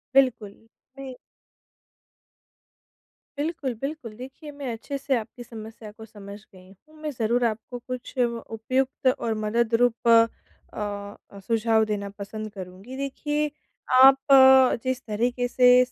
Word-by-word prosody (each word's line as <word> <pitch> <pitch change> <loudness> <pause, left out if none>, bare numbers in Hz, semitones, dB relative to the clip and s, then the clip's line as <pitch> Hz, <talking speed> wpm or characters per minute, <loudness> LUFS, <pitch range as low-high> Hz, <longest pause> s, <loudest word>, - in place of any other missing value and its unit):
बिल्कुल, 255 -6 +3 0.5
नहीं। 265 -1 -7 2.2
बिल्कुल, 290 -4 -2
बिल्कुल। 275 -5 -5
देखिए 270 +5 -10
मैं 285 -3 -5
अच्छे 235 +5 -5
से 275 0 0
आपकी 235 +2 -8
समस्या 220 -1 -10
को 220 +1 -12
समझ 205 -2 -11
गई 185 0 -16 0.2
हूँ 310 - -20
मैं 305 -1 -3
ज़रूर 240 0 0
आपको 230 +2 -3
कुछ 255 +1 -7
उपयुक्त 245 +3 -1
और 230 - -1
मदद 230 +2 0
रूप 240 -1 +1
अ 230 0 +7 1.1
अ, - - -9
सुझाव 220 +2 +1
देना 205 -2 -3
पसंद 215 +2 -6
करूँगी। 190 +5 -9
देखिए 295 +2 -2 0.4
आप 265 +1 +8 0.7
जिस 260 0 -2
तरीके 240 +3 -1
से 250 0 +3 0.2
स 250 - -24
235 Hz, 130 wpm, -25 LUFS, 220-265 Hz, 2.2 s, आप